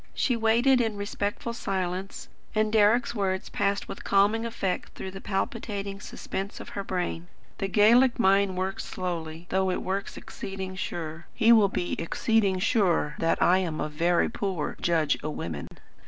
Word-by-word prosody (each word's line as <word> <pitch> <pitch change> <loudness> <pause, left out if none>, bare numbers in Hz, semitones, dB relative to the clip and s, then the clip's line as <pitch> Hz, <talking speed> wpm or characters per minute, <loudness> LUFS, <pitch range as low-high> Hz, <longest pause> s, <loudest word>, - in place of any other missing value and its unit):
She 250 - +1
waited 235 +3 +4
in 225 -2 -1
respectful 205 +3 -3
silence, 190 -3 -3 0.3
and 215 0 +1
Deryck's 220 +3 +4
words 190 -4 -1
passed 200 0 0
with - - -8
calming 210 +4 +3
effect 195 -5 -3
through 190 - -6
the 195 +1 -9
palpitating 200 -1 -3
suspense 195 -1 -6
of - - -8
her 200 - -4
brain. 90 - -3 0.3
"The 195 - 0
Gaelic 235 +6 +5
mind 195 -3 +3
works 190 +1 -2
slowly, 170 -3 -5
though 190 0 +1
it 180 - -2
works 195 +1 -3
exceeding 190 -1 -6
sure. 165 -3 -5
He 225 +1 +5
will 215 -4 +6
be 180 -2 -2
exceeding 200 +3 +1
sure 185 -7 +2
that 165 0 +2
I 185 +2 +5
am 165 -4 -2
a 150 - -2
verra 170 +3 +2
poor 190 -9 -2
judge 160 -4 +2
o' 155 - -2
women." 80 - -5
195 Hz, 160 wpm, -27 LUFS, 180-215 Hz, 0.3 s, will